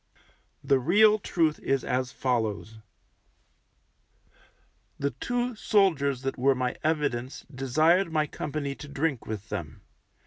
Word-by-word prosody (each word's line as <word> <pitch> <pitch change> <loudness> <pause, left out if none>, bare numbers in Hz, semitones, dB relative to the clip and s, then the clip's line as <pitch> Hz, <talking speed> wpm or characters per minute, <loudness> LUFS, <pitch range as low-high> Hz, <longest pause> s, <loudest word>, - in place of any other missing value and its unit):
The 135 -1 +3
real 210 - +5
truth 165 -6 0
is 135 -2 0
as 125 0 -1
follows: 110 -3 -2 2.2
The 140 0 -1
two 245 0 -2
soldiers 165 - +1
that 135 -1 -3
were 135 +1 +3
my 125 -1 -1
evidence 145 -5 -1
desired 155 +8 +2
my 155 -1 +1
company 145 -1 -4
to 145 - -10
drink 145 -2 -2
with 110 -1 -6
them. - - -6
140 Hz, 115 wpm, -27 LUFS, 130-165 Hz, 2.2 s, real